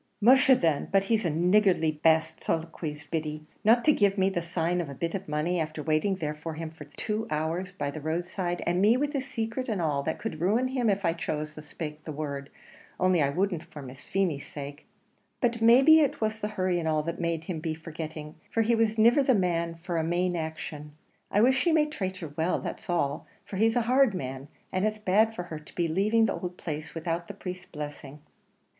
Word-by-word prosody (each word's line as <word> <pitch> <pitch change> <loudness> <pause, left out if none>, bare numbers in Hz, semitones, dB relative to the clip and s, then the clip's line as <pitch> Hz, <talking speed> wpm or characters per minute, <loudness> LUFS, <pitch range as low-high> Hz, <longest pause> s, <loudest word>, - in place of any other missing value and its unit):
"Musha 260 +5 +6
then, 160 - +1
but 195 0 +4
he's 220 0 +1
a - - +2
niggardly 175 0 +3
baste!" 160 +1 +2
soliloquised 155 -2 -3
Biddy, 155 -1 -3 0.2
"not 230 +3 +5
to 305 - +6
give 200 -4 +2
me 190 0 +3
the 175 - -1
sign 170 +1 -1
of 160 - -5
a 140 - -7
bit 165 +4 -3
of 195 0 -4
money, 155 +4 0
after 155 -1 -3
waiting 155 +6 +1
there 150 -4 -3
for 155 +1 -6
him 160 0 -6
these 150 - -9
two 220 +1 -2
hours 160 +5 -2
by 145 -6 -3
the 155 - -7
road 160 +3 -1
side, 175 -1 -3
and 175 +1 +1
me 220 +5 +5
with 290 +2 -1
his 275 -1 -2
sacret 235 +1 -3
and 210 -4 -1
all, 150 -4 0
that - - -2
could 210 -7 -5
ruin 225 +8 +2
him 250 -4 +1
if 200 -1 0
I 165 - +3
chose 155 -2 -3
to 155 - -9
spake 150 0 -7
the 155 - -6
word, 140 -2 -5 0.5
only 185 -2 +3
I 140 - +3
wouldn't 180 +2 0
for 155 -4 -10
Miss 130 0 -11
Feemy's 175 -8 0
sake. 145 0 -8 0.5
But 235 -2 0
maybe 265 +8 +7
it 290 -4 +1
was 220 0 -1
the 210 - -2
hurry 185 -4 0
and 160 - -2
all 155 -1 +1
that 170 +2 -4
made 165 -1 -1
him 165 -1 -4
be 160 0 -3
forgitting, 155 -1 -7 0.2
for 225 - +1
he 235 +2 +2
was 225 -1 +2
niver 235 +6 +6
the 265 -2 +4
man 170 -3 0
for 170 +1 -4
a 160 - +1
mane 175 +2 0
action. 155 -2 -5 0.4
I 205 - +3
wish 260 +3 +4
he 345 - +3
may 315 -1 +4
trate 190 -12 -4
her 160 -5 -7
well, 165 +3 +1
that's - - -7
all; 145 -5 0 0.2
for 195 - -6
he's 225 +3 +3
a 245 - +3
hard 250 -2 +3
man, 135 -2 -5 0.2
and 185 - 0
it's 215 0 0
bad 215 +2 +2
for 175 - -4
her 165 -3 -7
to 150 - -17
be 170 -1 +1
leaving 210 +7 +3
the 205 - 0
ould 180 0 -4
place 155 -1 -6
without 165 +1 -2
the 205 - -8
priest's 180 -2 -7
blessing." 145 -1 -8
175 Hz, 225 wpm, -28 LUFS, 155-215 Hz, 0.5 s, maybe